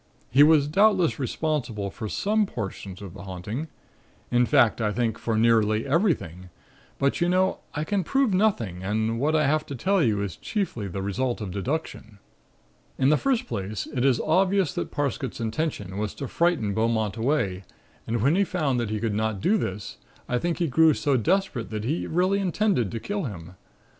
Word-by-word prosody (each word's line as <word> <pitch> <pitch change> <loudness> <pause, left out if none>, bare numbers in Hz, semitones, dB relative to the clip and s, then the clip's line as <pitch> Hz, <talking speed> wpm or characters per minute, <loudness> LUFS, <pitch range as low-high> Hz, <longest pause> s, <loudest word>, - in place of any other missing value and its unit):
He 135 +4 +5
was 150 -1 +6
doubtless 190 0 +3
responsible 125 -7 -2
for 110 0 -6
some 210 - +1
portions 100 - -6
of 95 -4 -8
the 95 - -10
'haunting'; 100 - -5 0.6
in 120 0 +3
fact 120 -6 +4
I 105 -1 +1
think 110 0 -1
for 115 -2 -1
nearly 110 -1 +3
everything, 135 - 0 0.5
but, 140 +4 0
you 175 - +3
know, 185 +1 +2 0.2
I 150 - -1
can 200 +3 0
prove 270 +2 +1
nothing 120 - 0
and 110 +3 -1
what 150 +4 +1
I 155 -1 +3
have 155 +2 +2
to 140 - -5
tell 190 +9 +1
you 110 -8 +2
is 100 -4 -5
chiefly 185 - -3
the 95 +1 -4
result 120 +5 -1
of 105 -4 -5
deduction. 110 - -4 0.8
"In 130 - +3
the 155 - +5
first 260 - 0
place, 100 - -4
it 125 - 0
is 135 -3 +3
obvious 185 +2 +2
that - - -3
Parsket's 140 -2 -3
intention 110 - -3
was 105 -1 -3
to 140 - -5
frighten 160 - +1
Beaumont 110 -2 0
away 110 -7 0 0.4
and 115 -1 -1
when 140 +6 +4
he 200 - +4
found 155 -9 0
that 115 -3 -2
he 110 0 -2
could 110 -1 -1
not 110 -1 -1
do 200 - +2
this, 105 - -4 0.3
I 125 - 0
think 170 +3 -1
he 175 - +1
grew 160 +2 +4
so 145 -2 +1
desperate 155 - 0
that 110 -1 -4
he 150 +9 -1
really 185 +4 +1
intended 190 - +1
to 115 - -4
kill 205 - -3
him. 90 -6 -7
125 Hz, 190 wpm, -25 LUFS, 105-170 Hz, 0.8 s, was